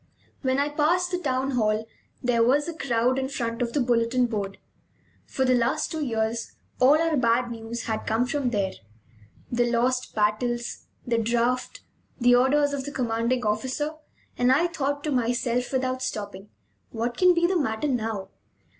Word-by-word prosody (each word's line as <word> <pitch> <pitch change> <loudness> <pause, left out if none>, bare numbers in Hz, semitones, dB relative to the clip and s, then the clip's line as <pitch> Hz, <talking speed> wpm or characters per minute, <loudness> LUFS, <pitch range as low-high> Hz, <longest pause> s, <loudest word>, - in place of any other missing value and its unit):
When 260 -1 +1
I 285 +1 +1
passed 340 +5 +1
the 360 - -1
town 265 -3 -1
hall 220 -3 0 0.4
there 245 -2 +2
was 280 +6 +3
a 340 - -3
crowd 250 -3 +1
in 265 0 -2
front 235 -4 -3
of 235 -1 -1
the 295 - +1
bulletin 245 0 +2
board. 200 -4 -3 0.7
For 265 - -1
the 255 - +4
last 250 +6 +1
two 315 -2 -2
years 225 -2 -2 0.3
all 280 +5 +6
our 330 -1 +1
bad 240 -1 +2
news 230 0 -6
had 220 -1 -3
come 225 +3 +2
from 260 0 -1
there 200 -5 0 0.8
the 240 0 +1
lost 250 +2 0
battles, 235 +3 -1 0.2
the 235 -1 +1
draft, 235 +2 0 0.4
the 245 0 +5
orders 285 +4 +3
of 270 -2 -3
the 285 - -5
commanding 240 -1 -1
officer 260 +8 -1 0.5
and 245 +1 +4
I 295 +6 +4
thought 285 -4 -2
to 305 - -2
myself, 245 0 0
without 255 -1 -1
stopping: 205 -4 -5 0.4
"What 235 +1 -3
can 365 +3 +5
be 340 0 +3
the 370 +2 +1
matter 220 0 -1
now?" 220 -7 -2
245 Hz, 170 wpm, -25 LUFS, 230-275 Hz, 0.8 s, all